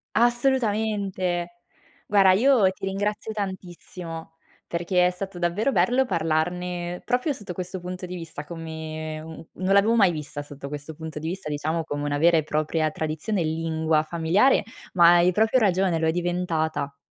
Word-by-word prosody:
Assolutamente. 215 -8 +1 0.6
Guarda 195 -2 +5
io 225 0 +5
ti 190 - -7
ringrazio 205 +3 -2
tantissimo, 175 -4 -6 0.3
perché 175 +1 +1
è 180 - +4
stato 190 0 -6
davvero 180 +10 +1
bello 260 +1 +3
parlarne 175 0 -1
proprio 250 +4 +1
sotto 205 -7 -8
questo 185 +1 -5
punto 180 +1 -6
di 180 0 -6
vista 165 -4 -7
come 160 -1 -6
un 160 +1 -10
non 190 +2 0
l'avevo 210 +4 +4
mai 195 -5 +5
vista 150 -2 -5
sotto 145 -1 -9
questo 145 +2 -7
punto 160 -1 -7
di 160 - -5
vista, 180 -2 -4
diciamo 155 +3 -1
come 145 -2 -4
una 145 0 0
vera 165 +2 +5
e 155 - +2
propria 155 +1 0
tradizione 160 +7 -2
e - - +1
lingua 160 -1 0
familiare, 170 - +3 0.3
ma 175 -1 +7
hai 175 +1 +4
proprio 220 +6 +3
ragione, 185 -5 +2
lo 160 - +1
è 160 - +3
diventata. 165 -5 -1
175 Hz, 160 wpm, -25 LUFS, 160-195 Hz, 0.6 s, ma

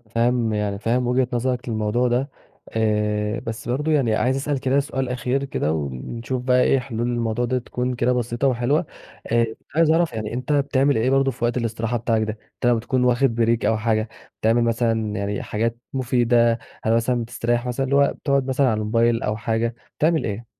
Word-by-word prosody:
فاهم، 120 -1 +2
يعني 105 -1 -1
فاهم 120 +3 0
وجهة 125 +1 +2
نظرك 125 0 -1
للموضوع 110 +2 0
ده، 125 +4 0 0.4
آآ، 105 -1 0
بس 115 0 -6
برضه 150 +6 0
يعني 130 -8 +2
عايز 125 +4 +1
أسأل 140 +1 -1
كده 130 +2 +2
سؤال 135 -2 -2
أخير 125 +2 -1
كده 80 - -1
ونشوف 80 - -4
بقى 125 0 +4
إيه 135 - +3
حلول 120 -2 -3
الموضوع 120 -1 -1
ده، 130 +1 0
تكون 125 +1 -3
كده 120 +1 +1
بسيطة 120 +2 0
وحلوة. 135 +6 +1 0.5
آآ، 115 0 +4
كنت 110 -1 -5 0.2
عايز 165 -1 +4
أعرف 165 -3 +2
يعني، 110 -1 -4
أنت 125 +4 -2
بتعمل 140 -1 +2
إيه 115 +3 +2
برضه 135 0 +3
في 120 - -8
وقت 120 +1 +1
الاستراحة 115 0 -1
بتاعك 115 -1 0
ده، 110 0 -4 0.2
أنت - - -5
لو 120 -1 +4
تكون 125 +3 0
واخد 125 0 +2
بريك 115 0 +1
أو 110 - +2
حاجة، 110 0 0 0.3
بتعمل 115 +2 +3
مثلًا 115 -2 0
يعني 100 -1 -2
حاجات 115 +2 -2 0.2
مفيدة، 120 -2 +2 0.2
هل 110 +1 +2
مثلًا 120 +1 +1
بتستريح 120 +1 -1
مثلًا، 125 +2 -1
اللي 135 +1 0
هو 140 0 +4
بتقعد 140 -1 +2
مثلًا 135 +1 +2
على 110 -2 0
الموبايل 115 +2 +1
أو 105 0 -1
حاجة، 115 +2 -1 0.2
بتعمل 160 +1 +2
إيه؟ 110 +3 -4
120 Hz, 195 wpm, -22 LUFS, 115-130 Hz, 0.5 s, بقى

